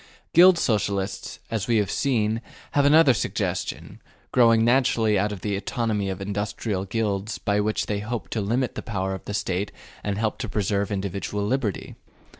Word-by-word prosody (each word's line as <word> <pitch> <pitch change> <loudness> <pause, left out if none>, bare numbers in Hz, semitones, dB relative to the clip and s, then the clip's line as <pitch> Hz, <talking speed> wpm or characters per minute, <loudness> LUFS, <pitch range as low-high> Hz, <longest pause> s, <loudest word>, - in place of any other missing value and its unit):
Guild 180 +1 +8
Socialists, 100 -7 -1
as 110 -4 -2
we 115 -2 +3
have 105 -2 +1
seen, 115 -5 +1 0.3
have 145 -1 +3
another 145 -1 +6
suggestion, - - -3 0.3
growing 115 -2 +5
naturally 115 -4 +3
out 105 +2 0
of 100 -3 -6
the 100 0 -1
autonomy 105 -1 -1
of 95 - -4
industrial 100 0 -3
guilds, 105 0 -2
by 100 0 0
which 105 +1 0
they 105 -1 -2
hope 110 +3 -4
to 110 - -2
limit 120 +6 0
the - - -5
power 95 -3 -2
of 95 - -6
the 105 - -5
State 95 0 -1 0.3
and 100 -1 -2
help 110 +2 -1
to 120 -4 -4
preserve 100 -1 0
individual 100 +1 -2
liberty. 110 -3 -2
105 Hz, 170 wpm, -25 LUFS, 100-115 Hz, 0.3 s, Guild